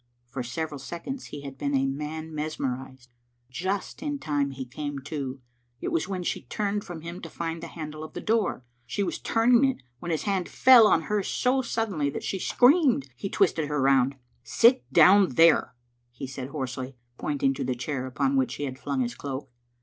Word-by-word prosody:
For 125 +2 -5
several 145 +4 -4
seconds 175 - -6
he 145 - -8
had 135 -1 -8
been 140 0 0
as 135 - +3
a - - +1
man 150 +3 -4
mes 155 +1 -3
merised. 130 -1 -5 0.4
Just 190 - -3
in 290 -1 -2
time 145 - -1
he 135 -1 -6
came 145 +3 -5
to. 140 -2 -4 0.4
It - - -3
was 165 - 0
when 185 -2 -3
she - - -2
turned 205 -1 -2
from 175 -3 -8
him 170 +3 -7
to 165 - -7
find 165 0 -4
the - - -6
handle 155 -1 -7
of 155 - -9
the - - -5
door. 215 - 0 0.2
She 200 - -1
was - - -3
turn 225 +2 +2
ing 275 - +4
it 265 - -1 0.2
when 175 - -6
his 160 -2 -1
hand 195 -4 -1
fell 250 -4 +7
on 165 - +3
hers 210 +3 -1
so 260 +1 +1
suddenly 215 - -1
that - - -5
she 190 - -2
screamed. 250 - +4
He 135 +11 -5
twisted 165 -7 +2
her 150 0 -1
round, 135 0 +3 0.3
"Sit 245 - +3
down 190 -7 +6
there," 165 -5 +5 0.3
he 120 +2 -7
said 130 0 -6
hoarsely, 130 -2 -5 0.2
pointing 140 -2 +1
to - - -4
the 130 0 -1
chair 130 +1 -3
upon 135 +2 0
which 130 -1 +1
he - - -5
had 130 -1 -4
flung 140 -2 -2
his 120 -1 -1
cloak. 135 +1 -6
150 Hz, 205 wpm, -27 LUFS, 135-190 Hz, 0.4 s, fell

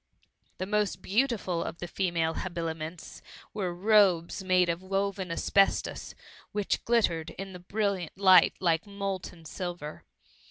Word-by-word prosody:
The 185 - -3
most 205 -2 -1
beautiful 205 -6 0
of - - -6
the 175 - -6
female 170 -3 0
habiliments, 165 -2 -5 0.3
were 195 -4 -2
tobes 190 -2 +3
made 185 -1 +3
of 170 +1 -1
woven 195 0 -2
asbestos, 195 +3 +1 0.4
which 205 -1 -1
glittered 175 -9 +1
in 195 0 -6
the 180 - -8
brilliant 195 -2 -2
light 185 -3 +6
like 170 +1 +1
molten 195 -4 -5
silver. 175 -3 -6
185 Hz, 125 wpm, -29 LUFS, 170-200 Hz, 0.4 s, light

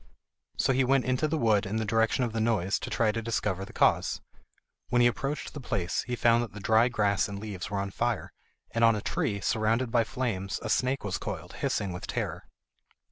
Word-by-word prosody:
So 135 - +2
he 130 +1 +3
went 135 0 +2
into 130 +4 +1
the 160 +1 -1
wood 110 -6 +2
in 100 - -3
the 110 0 0
direction 115 +4 +2
of 115 -3 -2
the 115 - -1
noise 105 -4 +1
to - - -5
try 115 -2 +2
to 115 - -3
discover 105 -4 -1
the - - -12
cause. - - +2 0.7
When 125 - +2
he 120 - +6
approached 135 +4 -1
the 150 - -6
place 95 -7 -1
he 125 - -1
found 120 0 +4
that 115 - -7
the 105 - -8
dry 110 +4 +4
grass 105 -5 +1
and 100 -1 -6
leaves 100 -3 -6
were 100 - -2
on 100 0 -2
fire, 120 +1 -2 0.4
and 115 - 0
on 115 -1 +6
a 105 - -3
tree, 100 0 -1
surrounded 115 +4 +1
by 120 -1 +4
flames, 105 -5 -3
a 110 - -3
snake 130 +4 +1
was 100 -3 -2
coiled, - - -6
hissing 100 -3 -1
with 90 - -6
terror. - - -3
115 Hz, 220 wpm, -28 LUFS, 100-120 Hz, 0.7 s, he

